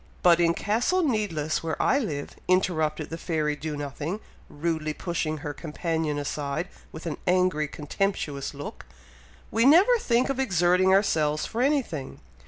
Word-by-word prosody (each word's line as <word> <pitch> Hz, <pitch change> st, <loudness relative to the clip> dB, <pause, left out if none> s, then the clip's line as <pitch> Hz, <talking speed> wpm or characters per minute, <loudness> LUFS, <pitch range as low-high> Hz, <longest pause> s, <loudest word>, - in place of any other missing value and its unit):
"But 175 Hz, -1 st, +6 dB
in 170 Hz, -1 st, +3 dB
Castle 245 Hz, -, +1 dB
Needless 200 Hz, -, 0 dB
where 160 Hz, -2 st, -3 dB
I 275 Hz, -, +3 dB
live," 150 Hz, -, -4 dB
interrupted 160 Hz, -5 st, +1 dB
the 165 Hz, -, -5 dB
fairy 155 Hz, -3 st, -1 dB
Do 150 Hz, +1 st, -5 dB
nothing, 145 Hz, +7 st, -4 dB, 0.3 s
rudely 155 Hz, 0 st, -2 dB
pushing 160 Hz, -3 st, -2 dB
her 145 Hz, -, -3 dB
companion 160 Hz, 0 st, -2 dB
aside, 145 Hz, +3 st, -3 dB, 0.2 s
with 160 Hz, -, -9 dB
an 165 Hz, -, -3 dB
angry 180 Hz, -4 st, +2 dB
contemptuous 150 Hz, -2 st, -2 dB
look, 145 Hz, -, -8 dB, 0.6 s
"we 225 Hz, -, +2 dB
never 355 Hz, -, +7 dB
think 245 Hz, -, +2 dB
of 270 Hz, -1 st, -1 dB
exerting 185 Hz, -5 st, +3 dB
ourselves 155 Hz, -6 st, +2 dB
for 230 Hz, -, -3 dB
anything. 255 Hz, -, -1 dB
165 Hz, 145 wpm, -26 LUFS, 150-200 Hz, 0.6 s, never